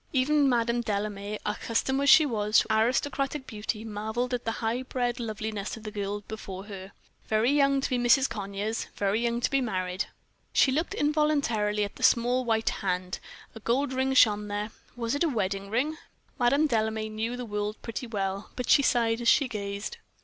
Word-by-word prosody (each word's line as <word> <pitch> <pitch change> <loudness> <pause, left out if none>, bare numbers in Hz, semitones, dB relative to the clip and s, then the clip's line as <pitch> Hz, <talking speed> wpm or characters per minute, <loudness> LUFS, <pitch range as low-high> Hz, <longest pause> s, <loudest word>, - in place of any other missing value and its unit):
Even 280 +1 +3
Madame 235 -1 +1
Delame, 205 -1 -3
accustomed 230 +5 0
as 280 - +3
she 310 - +8
was 215 -4 +1
to 220 - +3
aristocratic 265 +4 0
beauty, 215 -1 -4
marveled 220 +4 -3
at 245 - -2
the 225 - 0
high 230 +2 -1
bred 250 -1 -2
loveliness 215 -2 -4
of 220 - -12
the 215 - -6
girl 205 0 -3
before 195 -3 -7
her. 195 -2 -9 0.4
Very 220 +4 +2
young 275 -1 +3
to - - 0
be 250 - +1
Mrs. 250 +3 +4
Conyers 205 +2 -3
very 205 +2 0
young 235 0 0
to - - +2
be 275 -1 +2
married. 185 -5 -2 0.5
She 265 - +5
looked 315 +6 -1
involuntarily 285 -9 +1
at 200 - -5
the - - -12
small 245 +2 +3
white 225 -2 +1
hand; 180 -2 -2 0.3
a 225 - -9
gold 255 +5 0
ring 265 +1 0
shone 210 -4 +5
there 205 +1 -3 0.2
was 235 -1 -2
it 285 - +1
a 330 - +2
wedding 200 -5 -2
ring? 275 +8 0 0.4
Madame 275 +5 +4
Delame 220 -3 -1
knew 225 +3 -2
the 250 - -5
world 210 0 -3
pretty 230 +2 -5
well, 195 -2 -3
but 250 - -1
she 280 - +7
sighed 235 -3 +2
as 235 - -2
she 275 +3 +5
gazed. 200 -3 -5
225 Hz, 185 wpm, -28 LUFS, 210-255 Hz, 0.5 s, she